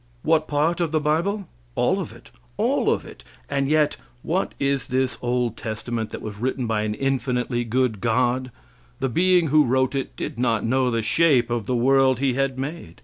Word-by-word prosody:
What 155 -1 +2
part 155 +4 +1
of 165 -3 0
the 155 - +2
bible? 170 +7 0 0.3
All - - +2
of - - -5
it; - - -16 0.3
all - - +2
of - - -1
it; - - -12 0.2
and 140 -1 0
yet 150 0 +2 0.3
what 180 +4 -1
is 140 -1 0
this 130 0 0
old 120 -2 0
testament 110 0 -4
that - - -8
was 105 -1 -7
written 130 +1 -1
by 110 -2 0
an 105 0 -2
infinitely 125 -2 -1
good 120 -2 0
God? 125 +2 +1 0.5
The 135 - 0
being 175 +4 +3
who 155 +2 +5
wrote 130 +1 +1
it 135 -1 -3
did - - -5
not 115 -4 +1
know 130 +2 +2
the 115 -2 -1
shape 130 0 +3
of 115 -4 -2
the 125 - 0
world 130 +1 +4
He 135 0 +1
had 135 0 -1
made. 135 - -6
130 Hz, 195 wpm, -23 LUFS, 120-150 Hz, 0.5 s, who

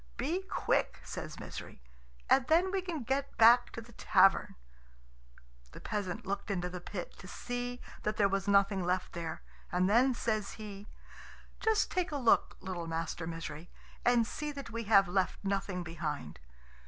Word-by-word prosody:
"Be 320 +9 -1
quick," 380 - 0
says - - -6
Misery; - - -8 0.5
"and 265 -1 +4
then 350 +4 +4
we 385 -1 0
can 340 -7 -4
get 270 +3 -2
back 240 +2 +7
to 230 - -5
the 230 +1 -14
tavern." 195 -3 +4 1.2
The - - -9
peasant 205 -5 -3
looked 200 +2 -3
into 180 -3 -1
the 180 -1 -6
pit 180 -1 -6
to 185 - -10
see 245 +4 -4 0.2
that 210 0 -2
there 205 - +5
was 195 0 -1
nothing 200 -1 +3
left 180 +1 -1
there, 165 -1 -5 0.3
and 180 +1 +2
then 245 +5 +4
says 215 -3 -1
he, 205 -1 -9 0.7
"Just 440 -1 +2
take 360 -2 0
a 290 - -1
look, 240 -5 +3
little 180 -3 -4
Master 165 0 -3
Misery, 165 0 -6 0.3
and 240 -1 +4
see 300 +5 -4
that 280 -4 -8
we 230 0 -4
have 200 -2 +6
left 185 0 0
nothing 195 -2 -1
behind. 155 - -5
205 Hz, 165 wpm, -32 LUFS, 180-245 Hz, 1.2 s, back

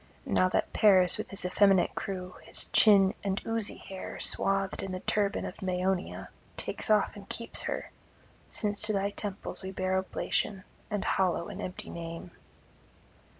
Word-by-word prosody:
And - - -3
now 185 - +4
that - - 0
Paris, 185 -4 +5
with - - -4
his 195 -1 -2
effeminate 190 0 +4
crew, 185 -3 -5
his - - +1
chin 200 -3 +6
and 195 -1 0
oozy 225 -2 0
hair 190 -1 -8
swathed 195 -1 +1
in 195 - -4
the 185 - -3
turban 205 -1 0
of - - -8
Maeonia, 185 0 -1 0.3
takes - - -2
and 205 -1 +1
keeps 230 - -3
her; - - -4 0.6
since 205 -1 0
to 215 - +1
thy 200 0 0
temples 200 -1 -5
we 190 - -5
bear 190 0 0
oblation, 190 +1 -1 0.3
and 205 -2 -2
hallow 175 -3 +1
an - - -6
empty 180 - -6
name.' 165 +1 -7
195 Hz, 155 wpm, -30 LUFS, 185-205 Hz, 0.6 s, chin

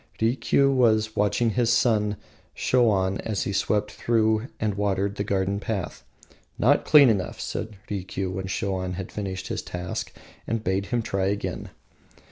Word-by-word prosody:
Rikiu 130 +4 +2
was 110 -4 +2
watching 110 +3 +2
his 120 +1 +2
son 105 -4 +2 0.4
Shoan 100 -6 +2
as 105 -4 -2
he 100 - -3
swept 105 +1 0
and 110 -1 +1
watered 100 0 -1
the 100 - -2
garden 100 0 0
path. 100 -3 -4 0.5
"Not - - +3
clean 145 -3 +8
enough," 100 -5 0
said 110 -1 -5
Rikiu, 95 -1 -3
when 95 0 -4
Shoan 95 -1 -2
had 95 0 -6
finished 95 -2 -5
his - - -2
task, 90 0 -5 0.4
and 115 0 -2
bade 95 0 -1
him 120 -2 -1
try 95 -3 -1
again. 100 +1 -3
105 Hz, 145 wpm, -25 LUFS, 95-110 Hz, 0.5 s, clean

